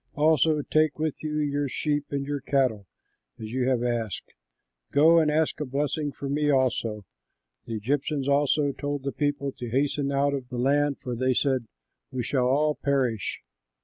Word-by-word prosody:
Also 155 0 +3
take 155 0 +2
with 155 -1 -2
you 150 -1 -3
your 145 -1 0
sheep 145 +2 -1
and 140 -1 -2
your 145 -1 -3
cattle, 130 -8 0 0.5
as 110 0 -7
you 125 0 0
have 125 -2 +1
asked, 115 -4 -3 0.6
go 165 +3 +6
and 155 -2 +3
ask 155 0 +1
a - - -1
blessing 145 +2 -1
for 140 - -6
me 145 +2 +1
also." 120 -6 +1 0.6
The 115 -2 -4
Egyptians 140 +5 -1
also 145 0 +2
told 145 0 -4
the 140 - -2
people 145 -1 -1
to 120 -2 -7
hasten 140 +2 0
out 140 +1 +2
of 130 -3 -4
the 125 - -5
land, 140 +3 +2
for 125 -1 -3
they 130 +1 +1
said, 130 -4 +1 0.4
"We 125 - -2
shall 125 0 +1
all 150 +4 +2
perish." 130 -7 -1
140 Hz, 175 wpm, -26 LUFS, 125-145 Hz, 0.6 s, go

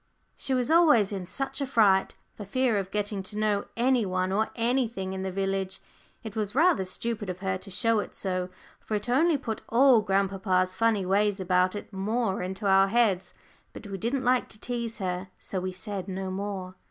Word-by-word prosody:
She 265 - -1
was 255 +3 0
always 300 - +5
in 190 -3 -4
such 270 +7 -3
a 275 - -1
fright, 205 -7 +3 0.2
for 210 - -8
fear 240 +2 +1
of 190 -1 -4
getting 205 -1 -2
to 190 +2 -8
know 210 -1 +1
any 250 0 +3
one 185 -1 -1
or 215 +3 +1
anything 230 -5 -1
in 190 - -4
the 190 0 -3
village. 195 0 -2 0.4
It 220 -1 -7
was 210 -1 -2
rather 320 - +4
stupid 210 +2 -3
of 180 0 -5
her 190 -1 0
to 195 - -10
show 225 +3 +1
it - - -5
so, 185 -1 -2 0.3
for 215 - -4
it 210 +3 -3
only 310 +5 +3
put 225 -5 -5
all 250 -1 +6
grandpapa's 195 -2 +1
funny 210 0 +1
ways 200 +1 +2
about 185 +1 +2
it 205 - -8
more 200 +1 -1
into 190 +3 -5
our 195 0 +5
heads, 205 -4 +1 0.4
but - - -10
we 195 -1 -6
didn't 255 +5 -1
like 250 0 +2
to 210 - -7
tease 235 -1 -3
her, 185 -2 -3
so 190 - -4
we 185 +1 -3
said 190 0 -6
no 190 0 -4
more. 190 -1 -4
205 Hz, 200 wpm, -27 LUFS, 190-235 Hz, 0.4 s, all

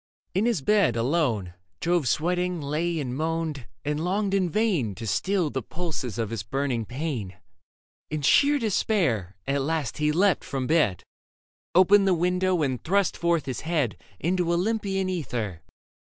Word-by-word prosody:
In 200 +5 +2
his 225 - 0
bed, 200 - +3
alone. 115 - 0 0.3
Jove 170 -5 +1
sweating 180 +4 0
lay 155 +3 -1
and 125 -4 -3
moaned, 160 -3 -2 0.2
and 150 +2 -1
longed 195 +2 0
in 190 -3 +2
vain 170 - +1
To 115 - -8
stiU 165 - 0
the 130 - -1
pulses 155 - -4
of 115 -2 -2
his 115 -4 -3
burning 125 +1 -2
pain. 120 - -4 0.7
In 150 -1 -3
sheer 285 - +5
despair 175 - 0
at 140 0 0
last 150 -2 -2
he 150 0 +2
leapt 185 +1 +3
from 135 -2 -3
bed. 150 - +2 0.7
Opened 195 +2 +6
the 185 - +4
window 180 0 +1
and 130 -3 -2
thrust 195 +2 +2
forth 170 -3 +1
his 130 -3 -3
head 155 -8 0 0.2
Into 175 +1 0
Olympian 195 +1 0
ether. 120 - -3
160 Hz, 150 wpm, -26 LUFS, 130-180 Hz, 0.7 s, Opened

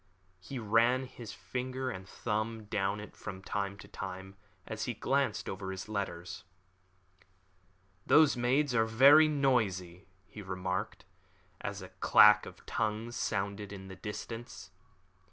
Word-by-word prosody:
He 130 +9 -7
ran 120 +3 +3
his 120 -4 -9
finger 130 +3 -4
and 95 -3 -8
thumb 110 0 -2
down 100 0 -1
it 105 - -10
from 95 -3 -8
time 100 0 -3
to - - -12
time, 95 0 -7 0.3
as - - -4
he - - -3
glanced - - 0
over 95 0 -5
his 95 +1 -6
letters. 90 -5 -4 1.6
"Those 150 -2 +6
maids 125 +3 +1
are 115 -1 +3
very 140 +7 +7
noisy," 100 - 0 0.2
he 95 +5 -10
remarked, 95 +1 -4 0.6
as - - -5
a - - -9
clack - - +6
of - - -13
tongues 110 +2 -2
sounded 100 0 -2
in 95 -1 -9
the 95 - -8
distance. 105 +1 -7
105 Hz, 135 wpm, -32 LUFS, 95-120 Hz, 1.6 s, very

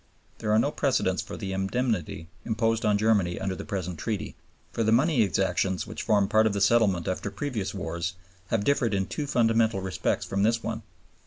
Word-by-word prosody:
There 105 - -1
are 105 - +5
no 140 +6 +2
precedents 125 -11 +1
for - - -8
the 95 -2 -4
indemnity 95 -4 -1 0.2
imposed 115 0 0
on 105 -1 +3
Germany 100 -5 +2
under 95 -1 -2
the - - -6
present 90 -4 -4
Treaty; 110 -3 -3 0.4
for 115 - 0
the 110 - +2
money 135 +3 +4
exactions 95 -1 +1
which - - -6
formed 100 -2 +2
part 110 0 +5
of 105 - 0
the 100 - -1
settlement 100 -5 +3
after 95 +2 -2
previous 115 -5 -3
wars 85 -1 -3 0.3
have 105 +1 0
differed 120 -5 +2
in 95 -1 0
two 150 +7 -4
fundamental 115 -4 +2
respects 95 -1 -1
from 100 - -1
this 115 +2 +2
one. 115 0 -3
105 Hz, 190 wpm, -27 LUFS, 95-115 Hz, 0.4 s, are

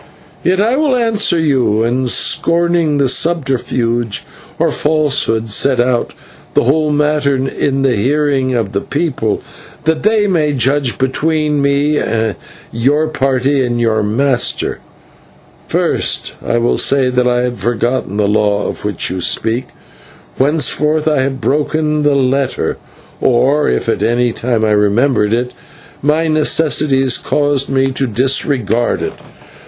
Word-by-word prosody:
Yet 185 +2 +1
I 230 +6 +2
will 295 -3 +2
answer 225 -7 +1
you, 130 -9 +1
and, 125 +2 0
scorning 170 -2 +1
subterfuge 125 -7 0 0.3
or - - +1
falsehood, 145 -7 0
set 130 +4 +2
out 120 0 0 0.4
the - - +3
whole 150 +5 +1
matter 150 -1 +1
in 135 +1 -1
the 135 -2 +2
hearing 135 +2 0
of 110 -5 -1
the 100 -1 -2
people, 145 -9 -2 0.4
that 160 0 0
they 215 0 +2
may 160 -7 +1
judge 135 0 0
between 150 +2 0
me, 140 +2 +1 0.7
your 145 +7 +1
party, 135 -1 0
and 120 -1 -2
your 110 -2 +1
master. 125 +5 0 0.9
First, - - 0
I 120 - 0
will 120 +1 +1
say 135 -2 +2
that 125 0 +1
I 120 0 +1
had 125 -2 -3
forgotten 120 0 -1
the 105 -1 +1
law 105 0 +1
of - - -6
which 105 -5 -2
you 90 0 -3
speak, 115 +7 0 0.7
whereof 150 +2 +1
I 150 -4 +2
have 135 0 -2
broken 150 +4 0
the 145 -1 +2
letter, 135 0 0 0.4
or, 130 +4 +2
if 60 - -1
at - - -1
any 120 +1 +1
time 115 -1 -1
I 105 - +1
remembered 105 +2 +2
it, 125 +1 -3 0.5
my 155 +3 +1
necessities 150 -4 +2
caused 145 -2 0
me 135 0 +1
to 130 0 -2
disregard 120 -1 0
it. - - -3
135 Hz, 135 wpm, -14 LUFS, 120-150 Hz, 0.9 s, the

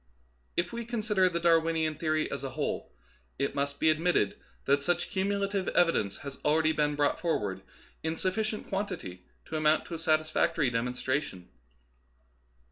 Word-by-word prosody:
If 170 - 0
we 235 0 -3
consider 215 -5 +1
the 170 -1 -2
Darwinian 165 -2 +3
theory 155 0 0
as - - -4
a - - -2
whole, - - -3 0.5
it 140 +1 -1
must 140 0 -2
be 160 - +5
admitted 165 +3 +1 0.3
that 140 +1 +3
such 175 +4 0
cumulative 200 0 0
evi 170 -1 +5
dence 100 -1 -1
has 140 -1 -7
already 155 +1 +3
been 150 -1 +1
brought 145 0 +1
forward 105 - -1 0.4
in 160 0 -1
suffi 185 +5 0
cient 215 0 -4
quantity 180 - -4 0.2
to 160 - -3
amount 155 0 +3
to - - -8
a 165 - -4
satisfactory 155 -2 +2
demon 120 +2 -1
stration. 130 -9 -2
160 Hz, 160 wpm, -30 LUFS, 145-180 Hz, 0.5 s, be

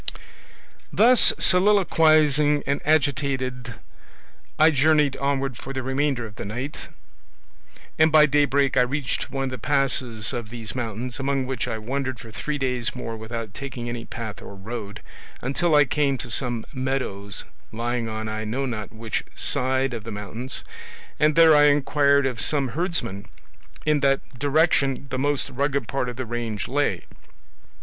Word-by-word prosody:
"Thus 240 +2 +6
soliloquising 155 -7 +4
and 140 - -1
agitated, 130 -5 0 0.8
I 155 +1 +6
journeyed 150 -1 +3
onward 135 -2 -1
for 135 - -7
the 130 -1 -3
remainder 135 -1 0
of 110 -1 -11
the - - -5
night, 125 +8 -6 1.1
and 155 0 +5
by 155 -1 +7
daybreak 140 -2 +2
I - - +6
reached 130 +1 -2
one 135 0 -3
of 135 - -1
the 130 - -6
passes 125 -5 +1
of 120 -3 -4
these 115 -1 -5
mountains, 120 +1 -4
among 135 -1 0
which 130 -3 -3
I 110 - -3
wandered 130 +3 -3
for 115 - -10
three 150 +6 -3
days 125 -2 -2
more 115 -2 -5
without 110 -1 -6
taking 125 -2 -6
any 120 -1 -5
path 110 -4 -7
or 100 - -10
road, 105 +1 -7 0.4
until 150 +5 +1
I 145 -1 +6
came 140 0 +1
to 125 -1 -7
some 120 -1 -1
meadows 130 -7 -3 0.3
lying 120 0 -2
on 110 0 -4
I 110 0 -3
know 125 +6 -2
not 110 -5 -5
which 110 -1 -3
side 130 0 0
of 115 -3 -5
the 115 - -7
mountains, 110 +5 -6 0.6
and 150 0 +3
there 165 -2 +7
I 145 0 +6
inquired 140 -1 +3
of 125 -4 -2
some 140 -4 0
herdsmen 160 - -2 0.6
in 150 -1 +3
what 135 -1 +3 0.2
direction 140 -2 +2
the 130 - -2
most 145 0 0
rugged 140 -1 -1
part 125 0 -2
of 125 - -6
the 130 +1 -4
range 115 -3 -4
lay. 130 - 0
130 Hz, 155 wpm, -24 LUFS, 115-145 Hz, 1.1 s, by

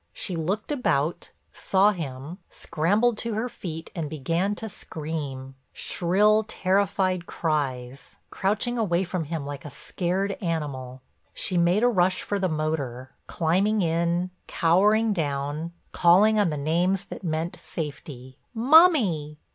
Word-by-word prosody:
She 185 - -4
looked 190 - -2
about, 170 - 0 0.2
saw 195 +2 +3
him, 155 -1 -6
scrambled 210 +9 0
to 230 -2 -2
her 225 +3 -1
feet 165 -8 -7
and 165 -6 -4
began 165 +7 -1
to 220 - -6
scream, 150 -8 -6 0.2
shrill, 210 +5 +2
terrified 185 -3 0
cries, 135 -5 -3
crouching 215 +5 -1
away 185 -4 +1
from 180 -2 -3
him 155 -1 -4
like 145 -1 -6
a 150 - -7
scared 185 +7 -2
animal. 135 -7 -4 0.3
She 185 - -2
made 175 +5 +3
a - - +6
rush 185 -5 +2
for 205 - -2
the 190 -1 0
motor, 145 -5 -3 0.2
climbing 190 +5 +1
in, 170 +2 0 0.2
cowering 210 +6 +3
down, 145 0 -2 0.2
calling 205 +5 +5
on 200 -4 +3
the 150 - -3
names 175 +6 +1
that - - -9
meant 160 0 -2
safety: 140 -4 -7 0.2
"Mummy! 225 - +4
170 Hz, 130 wpm, -25 LUFS, 150-200 Hz, 0.3 s, a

